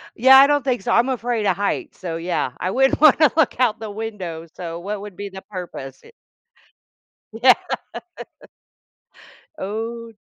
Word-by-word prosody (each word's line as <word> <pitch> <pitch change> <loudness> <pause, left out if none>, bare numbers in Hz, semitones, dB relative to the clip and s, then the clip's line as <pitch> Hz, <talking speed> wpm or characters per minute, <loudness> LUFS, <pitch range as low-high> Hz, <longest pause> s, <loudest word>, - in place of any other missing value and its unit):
Yeah, 265 +3 +7
I 275 - +9
don't 290 -1 +1
think 250 -7 -1
so. - - -1
I'm 240 +3 +3
afraid 240 -3 -2
of - - +2
heights, 280 - -3
so 170 -3 -4
yeah, 165 -6 -2
I 185 - -2
wouldn't 270 +7 +2
want 310 -3 +7
to 310 - +5
look 305 -5 +1
out 230 -4 +2
the 220 -2 -6
window. 200 -7 -6
So 170 -1 -7
what 200 +2 -5
would 205 -3 -9
be 200 0 -6
the 190 0 -10
purpose? 175 -9 -9 1.3
Yeah. - - +5 2.0
Oh 225 +3 -5
215 Hz, 160 wpm, -21 LUFS, 185-250 Hz, 2.0 s, I